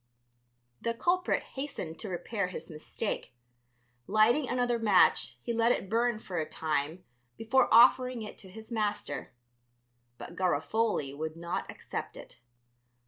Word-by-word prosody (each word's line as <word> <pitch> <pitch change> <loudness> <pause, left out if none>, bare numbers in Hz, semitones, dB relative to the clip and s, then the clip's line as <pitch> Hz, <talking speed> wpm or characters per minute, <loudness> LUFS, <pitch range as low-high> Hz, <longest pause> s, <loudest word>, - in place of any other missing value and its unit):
The 230 0 -1
culprit 355 +7 +1
hastened 265 - -6
to 210 - -6
repair 185 +3 -2
his 180 - -8
mistake; 155 - -5 0.7
lighting 230 +7 +3
another 245 -1 +1
match 220 -2 +4
he 235 - -2
let 230 +1 +3
it 190 - -1
burn 235 0 +2
for 185 -5 -4
a 155 - -3
time 160 +2 -2 0.3
before 235 +4 +2
offering 245 +1 +6
it 210 - -9
to 190 - -9
his 220 +4 -11
master. 210 -2 -2 0.9
But 170 - -9
Garofoli 180 -3 0
would 155 +1 -4
not 170 +1 -4
accept - - -6
it. - - -12
215 Hz, 135 wpm, -30 LUFS, 175-235 Hz, 0.9 s, offering